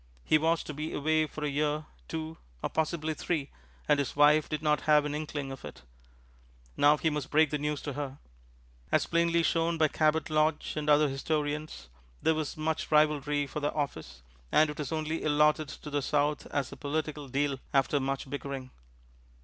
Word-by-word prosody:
He 155 - +4
was 165 +1 +1
to 150 - -6
be 155 +2 -4
away 155 +1 +1
for 150 +1 -7
a - - +1
year, 150 +1 0 0.2
two, 160 0 -5 0.2
or - - -2
possibly 160 0 -1
three, 155 -2 -2 0.4
and 145 -1 +4
his 140 - -2
wife 150 +1 +5
did 155 0 -3
not 150 -2 +2
have 150 -1 +6
an 145 - -2
inkling 150 -2 -4
of 135 - -9
it. - - -10 0.9
Now, 145 +1 +5
he 160 +1 +1
must 150 -2 -3
break 155 -1 +4
the 150 - -1
news 150 0 -2
to 145 - -4
her. 140 -1 -5 0.7
As - - +3
plainly 170 0 +2
shown 165 0 +1
by 155 -1 +3
Cabot 155 +1 +1
Lodge 155 0 +1
and 150 -1 -2
other 150 0 +5
historians, 150 - -3 0.3
there 160 - +2
was 155 -2 -3
much 155 +1 -2
rivalry 150 -1 +3
for 140 - -5
the 145 0 0
office, 80 - -4 0.3
and 155 0 +4
it 150 - -10
was 150 - -3
only 155 0 -2
allotted 150 0 +3
to 150 - -9
the 145 0 0
South 145 +2 0
as 140 -3 -2
a 140 - -9
political 150 0 -3
deal 140 +1 -1
after 140 +1 +2
much 135 0 -2
bickering. 135 -1 -5
150 Hz, 190 wpm, -30 LUFS, 145-155 Hz, 0.9 s, have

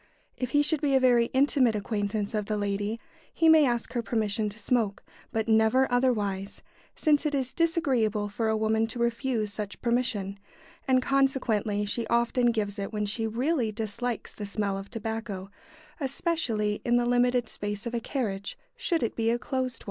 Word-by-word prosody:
If 250 - -3
he 290 +1 +3
should 300 0 +1
be 280 -3 +2
a - - +6
very 245 -2 +4
intimate 265 -4 +3
acquaintance 205 0 -2
of 210 -2 -1
the 215 - -1
lady, 205 +2 -2 0.3
he 330 - +2
may 315 -3 +7
ask 240 -2 -1
her 240 - 0
permission 215 -2 -1
to 205 - -9
smoke, 215 -2 0 0.3
but 220 0 -1
never 220 +4 +4
otherwise, 210 -6 0 0.3
since 300 -3 +2
it 300 -2 0
is 260 -2 -2
disagreeable 260 - +1
for 220 +2 -1
a 220 - +2
woman 220 +1 +1
to 225 - -6
refuse 235 -2 0
such 210 -2 -5
permission, 230 -5 -1 0.5
and 255 -1 +3
consequently 245 -7 +1
she 225 +2 -2
often 235 +1 +2
gives 205 -2 -2
it 200 - -3
when 210 -1 -1
she 225 +2 -2
really 245 +1 0
dislikes 225 +2 -4
the 205 - -6
smell 200 -1 -1
of 195 +1 -6
tobacco, 220 -4 -5 0.5
especially 260 -8 -1
in 240 0 +3
the 240 - +2
limited 245 0 +2
space 205 0 -4
of 235 - -4
a 235 - 0
carriage, 205 -6 -3 0.2
should 375 - 0
it 230 - -1
be 225 -1 +1
a 235 - +2
closed 255 0 -2
one. - - -10
230 Hz, 180 wpm, -28 LUFS, 210-255 Hz, 0.5 s, may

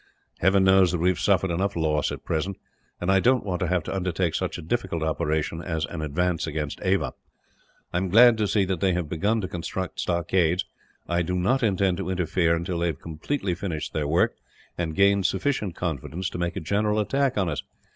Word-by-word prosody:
"Heaven 95 +2 +4
knows 95 -1 +5
that 90 - 0
we 85 +2 +2
have 90 -3 0
suffered 95 0 +2
enough 100 +4 -1
loss, 75 -3 +1
at - - -7
present; 90 +5 -2 0.4
and 90 +2 0
I 95 - +5
don't 125 +5 +3
want 90 -3 -2
to 90 - 0
have 90 -1 +1
to - - -4
undertake 90 -2 -1
such - - -2
a - - -7
difficult 85 -3 -2
operation 80 +1 -1
as 80 -3 -2
an 80 +2 -6
advance 85 +3 -1
against 75 -2 -3
Ava. 95 0 +1 0.8
I - - +1
am 95 +1 -1
glad 120 +5 +7
to 105 - +2
see 100 -1 +2
that 95 -2 -2
they 95 0 +2
have 85 -2 -1
begun 100 +8 0
to 95 - -3
construct 90 +1 -5
stockades. 85 0 +1 0.4
I 85 0 +1
do 90 +2 -2
not 100 +10 +1
intend 95 -5 +2
to 85 - -4
interfere 90 -2 +1
until 85 +1 -3
they 85 - +1
have 80 -5 -3
completely 90 - -3
finished 85 -3 -4
their 75 -2 -1
work, 85 +4 +2 0.4
and 80 -2 -3
gained 100 -1 +4
sufficient 100 -2 -1
confidence 85 +3 -3
to - - -5
make 85 0 -2
a 100 - -3
general 105 +5 +1
attack 135 +5 +1
on 95 -3 +1
us. 75 -5 -2
90 Hz, 210 wpm, -25 LUFS, 85-95 Hz, 0.8 s, glad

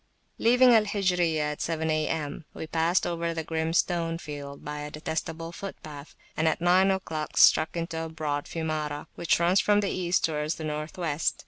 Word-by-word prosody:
Leaving 245 +2 +6
Al 220 -2 +5
Hijriyah 175 -7 +1
at 150 - -7
seven 160 -1 -1
A.M., 155 -1 -2
we - - -5
passed 165 +3 +1
over 170 -1 -2
the 160 - -2
grim 160 0 -2
stone 165 -1 +1
field 145 -3 -8
by 150 0 -4
a 150 0 -5
detestable 160 +2 -4
footpath, 155 -6 -9 0.2
and 160 - +1
at 160 - +1
nine 180 +3 +4
oclock 160 -5 -3
struck 155 +2 +5
into 165 -1 -3
a - - -6
broad 150 -3 -3
Fiumara, 155 -3 -3
which 170 - +1
runs 175 +3 +4
from 205 0 +3
the 200 -1 0
East 180 0 +1
towards 150 0 -1
the 160 - -7
North 150 +1 -4
West. 160 -3 0
160 Hz, 185 wpm, -27 LUFS, 155-175 Hz, 0.2 s, Leaving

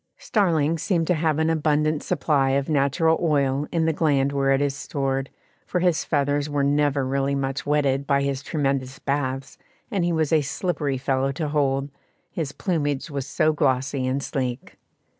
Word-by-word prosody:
Starlings 165 -6 +1
seem 170 -1 +1
to 180 - +2
have 155 -2 +1
an 160 0 +1
abundant 155 -1 +1
supply 145 -5 +1
of 140 - -2
natural 155 +3 +2
oil 145 -3 +1
in 165 -1 +1
the 160 - +2
gland 140 -3 +2
where 135 -1 +1
it 135 - +3
is 140 -1 0
stored, 135 -1 -2 0.4
for 180 - 0
his 175 -2 +2
feathers 145 0 0
were 145 -1 0
never 145 -1 +2
really 135 +1 0
much 135 0 -3
wetted 140 -2 +1
by 140 -1 +2
his 140 -1 -1
tremendous 135 -3 -2
baths, 135 -1 -3 0.3
and 195 -5 0
he 175 - +1
was 160 -2 0
a 155 - +5
slippery 145 -2 -2
fellow 135 +1 0
to 150 +2 -3
hold, 140 -1 0 0.4
his 155 -5 -3
plumage 150 -5 -2
was 140 -1 -4
so 155 +2 +2
glossy 135 -2 0
and 135 +2 -1
sleek. 130 -2 -4
145 Hz, 175 wpm, -24 LUFS, 135-155 Hz, 0.4 s, a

